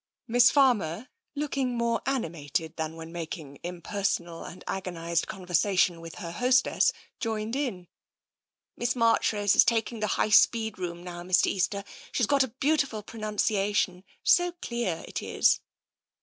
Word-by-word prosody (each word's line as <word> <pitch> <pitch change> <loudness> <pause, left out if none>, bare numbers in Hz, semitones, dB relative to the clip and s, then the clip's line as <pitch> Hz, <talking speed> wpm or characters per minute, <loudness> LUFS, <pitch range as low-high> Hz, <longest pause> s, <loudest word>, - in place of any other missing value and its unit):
Miss 245 +1 +6
Fanner, 245 - +2 0.3
looking 275 -4 -1
more 235 0 0
animated 165 - -2
than 160 0 -4
when 165 0 -9
making 160 -4 -7
impersonal 175 -1 -3
and 180 - -10
agonised 170 -3 -2
conversation 180 -3 +1
with 165 -1 -9
her 170 - -6
hostess, 250 +7 +3 0.3
joined 225 0 -2
in. 235 -11 -3 0.5
" - - -66
Miss 240 +1 -1
Marchrose 225 -3 +3
is - - +8
taking 230 -1 0
the 215 - 0
High - - +2
Speed 220 -1 +4
room 175 -1 -5
now, 175 -1 -7
Mr. 180 +1 +3
Easter. 200 +1 0 0.3
She's 245 - +1
got 280 +4 +3
a 260 - +3
beautiful 265 -3 0
pronouncia 210 -2 -1
tion 180 -3 0
— - - -45
so 355 0 -1
clear, 235 - -3
it - - -4
is." - - +2
205 Hz, 150 wpm, -28 LUFS, 175-240 Hz, 0.5 s, is